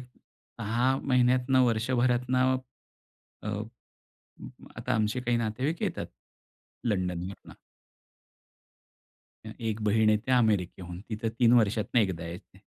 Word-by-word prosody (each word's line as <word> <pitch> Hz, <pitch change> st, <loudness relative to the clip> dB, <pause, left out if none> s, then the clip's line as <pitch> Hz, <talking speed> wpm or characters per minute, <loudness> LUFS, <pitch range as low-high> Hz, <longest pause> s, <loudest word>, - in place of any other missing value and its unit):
6 125 Hz, 0 st, -3 dB
महिन्यातनं 125 Hz, 0 st, +3 dB
वर्षभरातनं 125 Hz, +2 st, +2 dB, 0.9 s
अ, -, -, -5 dB, 1.3 s
आता -, -, -2 dB
आमचे 110 Hz, +2 st, 0 dB
काही 120 Hz, -1 st, +1 dB
नातेवाईक 125 Hz, +9 st, -2 dB
येतात -, -, -2 dB, 0.8 s
लंडनवरनं. 90 Hz, -3 st, -3 dB, 1.9 s
अ, -, -, -5 dB
1 110 Hz, -1 st, -2 dB
बहीण 110 Hz, +1 st, +4 dB
येते 110 Hz, +4 st, 0 dB
अमेरिकेहून. 95 Hz, -7 st, +1 dB
ती 110 Hz, +1 st, -6 dB
तर 115 Hz, -, +1 dB
3 120 Hz, -1 st, +5 dB
वर्षातनं 110 Hz, +2 st, +2 dB
एकदा 95 Hz, -5 st, -1 dB
येते. 90 Hz, +3 st, -10 dB
115 Hz, 100 wpm, -28 LUFS, 105-125 Hz, 1.9 s, 3